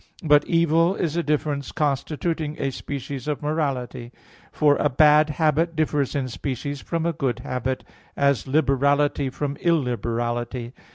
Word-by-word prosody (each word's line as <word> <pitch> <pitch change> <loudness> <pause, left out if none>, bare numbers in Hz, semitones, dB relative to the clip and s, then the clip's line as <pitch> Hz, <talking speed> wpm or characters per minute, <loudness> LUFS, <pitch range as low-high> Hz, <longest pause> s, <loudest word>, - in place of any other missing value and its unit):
But 150 -2 +5
evil 165 +2 +3
is 165 -5 -2
a 170 - +1
difference 150 -3 -1
constituting 150 +2 -2
a 135 - -1
species 140 0 -6
of 150 -1 -2
morality; 135 -5 -2 0.4
for 145 -1 +3
a 150 - +2
bad 150 +3 +5
habit 160 +2 +1
differs 150 -3 0
in 135 -2 -1
species 135 +3 -4
from 165 -1 -2
a 170 - +1
good 130 -5 -1
habit, 130 +1 -3 0.3
as 140 -1 +2
liberality 140 0 +2
from 140 +2 -4
illiberality. 120 -5 -1
145 Hz, 135 wpm, -24 LUFS, 130-155 Hz, 0.4 s, But